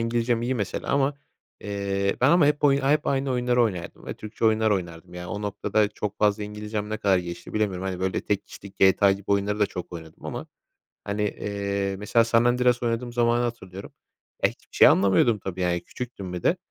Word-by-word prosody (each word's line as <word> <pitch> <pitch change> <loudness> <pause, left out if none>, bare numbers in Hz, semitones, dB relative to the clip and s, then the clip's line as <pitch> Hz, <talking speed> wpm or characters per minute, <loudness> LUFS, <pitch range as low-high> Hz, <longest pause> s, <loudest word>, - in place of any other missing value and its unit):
İngilizcem 115 0 0
iyi 130 +2 0
mesela 100 -5 -3
ama, 140 0 +2 0.5
eee, 100 -1 -1
ben 130 - +5
ama 170 -4 +5
hep 150 0 +1
oy 140 -1 +4
hep 145 +3 +2
aynı 135 0 0
oyunları 125 -1 +2
oynardım 90 -7 -3
ve - - -4
Türkçe 110 +1 -6
oyunlar 110 0 +3
oynardım. 90 -2 -3
Yani 90 0 -7
o 105 +1 -5
noktada 105 +1 0
çok 105 0 -5
fazla 105 0 +2
İngilizcem 105 0 -5
ne 110 - -1
kadar 100 -4 +2
gelişti 85 -1 -7
bilemiyorum. 95 -4 -1
Hani, 95 -1 -4
böyle, 95 -1 -1
tek 100 -1 -2
kişilik 100 -1 -12
GTA 95 +1 +5
gibi 100 0 -6
oyunları 100 +1 +1
da 105 - +4
çok 90 -2 -7
oynadım 80 -2 -10
ama, - - -5 0.6
hani, 100 +1 -2
eee, 100 -1 -2
mesela 115 +3 +2
San 115 0 +3
Andreas 125 0 +2
oynadığım 120 +1 -1
zamanı 120 0 +2
hatırlıyorum. 100 -5 -6 0.5
E, - - +7
hiçbir - - -16
şey - - +8
anlamıyordum 100 +4 +4
tabii, 95 -2 -6
yani, 90 -1 +1
küçüktüm 115 -7 -7
bir 90 -1 -5
de. 180 - +3
105 Hz, 200 wpm, -25 LUFS, 95-120 Hz, 0.6 s, şey